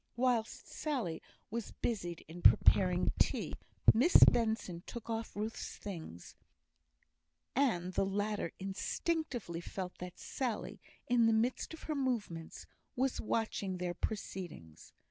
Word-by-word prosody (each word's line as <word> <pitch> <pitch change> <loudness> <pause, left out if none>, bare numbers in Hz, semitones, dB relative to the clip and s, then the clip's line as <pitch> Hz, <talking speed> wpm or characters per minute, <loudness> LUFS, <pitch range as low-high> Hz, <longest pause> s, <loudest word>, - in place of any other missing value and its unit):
Whilst 240 -2 0
Sally 245 - -2 0.3
was 230 -1 -4
busied 175 -7 -3
in 170 +2 -9
preparing 180 0 +5
tea, - - +1 0.4
Miss 270 +11 +3
Benson 220 -7 +3
took 230 -1 -6
off 225 0 -3
Ruth's 215 +2 -4
things; 160 - -8 1.2
and 185 -10 +1
the - - +2
latter 205 -2 -1
instinctively 205 - -2
felt 180 +1 -6
that 180 -1 -7
Sally, 245 -5 -3 0.2
in 240 -2 +4
the 225 - +4
midst 240 +8 0
of - - -15
her 310 - -2
movements, 230 - -2 0.3
was 260 +1 0
watching 210 -4 -1
their 180 -1 -2
proceedings. 175 - -6
215 Hz, 120 wpm, -34 LUFS, 180-240 Hz, 1.2 s, preparing